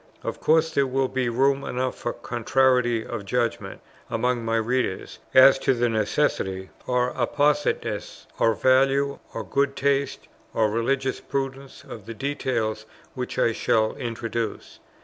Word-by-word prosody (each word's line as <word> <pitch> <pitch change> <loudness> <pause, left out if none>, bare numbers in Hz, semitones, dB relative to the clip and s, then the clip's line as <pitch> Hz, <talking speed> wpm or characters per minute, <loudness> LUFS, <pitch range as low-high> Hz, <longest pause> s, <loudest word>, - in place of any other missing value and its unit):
Of - - -4
course 160 +1 +3
there 140 -1 +2
will 130 0 0
be 130 -2 -1
room 135 +3 +2
enough 130 +1 -2
for 120 - -3
contrariety 120 -1 +1
of 100 - -5
judgment 120 +3 -2 0.3
among 120 +1 0
my 115 0 0
readers, 115 -3 -1 0.2
as 135 +1 +8
to 135 - +2
the 120 0 +1
necessity, 105 -4 -1 0.2
or 125 0 +1
appositeness, 140 -4 0
or 115 -1 +3
value, 135 +3 +2 0.2
or - - -3
good 140 0 0
taste, 140 0 0 0.3
or 110 -2 +2
religious 130 +4 0
prudence, 135 0 -5
of 110 -3 -10
the 115 - -6
details 115 -5 -2 0.3
which 125 -1 -5
I 115 - +3
shall 110 0 +1
introduce. 115 -3 -4
125 Hz, 140 wpm, -24 LUFS, 115-135 Hz, 0.3 s, as